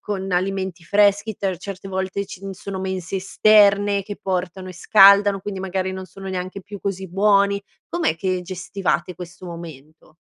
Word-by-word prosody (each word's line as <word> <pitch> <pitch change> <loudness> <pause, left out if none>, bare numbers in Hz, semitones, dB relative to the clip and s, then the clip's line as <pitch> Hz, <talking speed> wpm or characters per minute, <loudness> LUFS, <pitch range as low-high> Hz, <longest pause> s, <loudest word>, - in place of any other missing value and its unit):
con 195 -2 -4
alimenti 190 -1 -1
freschi 205 +2 +2
ter 190 -4 -2
certe 195 -1 -8
volte 190 +1 -3
ci 195 0 -10
n 195 -1 -5
sono 190 0 -6
mense 190 -1 -3
esterne 200 +1 +4
che 205 +1 -8
portano 185 0 -3
e - - -7
scaldano, 200 +1 +6
quindi 195 0 -6
magari 190 0 -2
non 190 0 -7
sono 195 +2 -11
neanche 185 +1 -4
più 205 +1 -10
così 190 -2 -4
buoni. 200 +1 +3 0.3
Com'è 335 - 0
che 185 0 -1
gestivate 180 -2 -2
questo 180 +1 -10
momento? 160 -2 -11
190 Hz, 165 wpm, -22 LUFS, 185-200 Hz, 0.3 s, scaldano